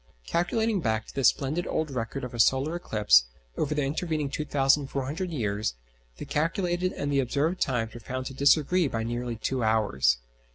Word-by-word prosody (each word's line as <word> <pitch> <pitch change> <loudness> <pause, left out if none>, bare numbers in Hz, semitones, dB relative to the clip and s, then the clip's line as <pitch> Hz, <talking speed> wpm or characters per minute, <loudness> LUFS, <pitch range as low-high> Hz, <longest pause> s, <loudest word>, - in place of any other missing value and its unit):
Calculating 210 +4 0
back 110 -3 0
to - - -13
this 135 - +3
splendid 150 +6 0
old 155 -2 -1
record 125 +1 -4
of 125 - -6
a 120 - -6
solar 135 +8 +3
eclipse, 105 - +4 0.3
over 150 +1 -1
the 150 - +1
intervening 150 0 -2
2,400 140 +3 0
years, 105 - -2 0.4
the - - -6
calculated 175 +3 0
and 145 - -3
the 140 - +2
observed 145 +7 0
times 120 -4 0
were 120 - -8
found 130 +3 -5
to 135 - -5
disagree 150 +5 +3
by 115 -4 -2
nearly 120 +1 -3
two 125 +2 -2
hours. 65 - +2
135 Hz, 170 wpm, -27 LUFS, 115-155 Hz, 0.4 s, eclipse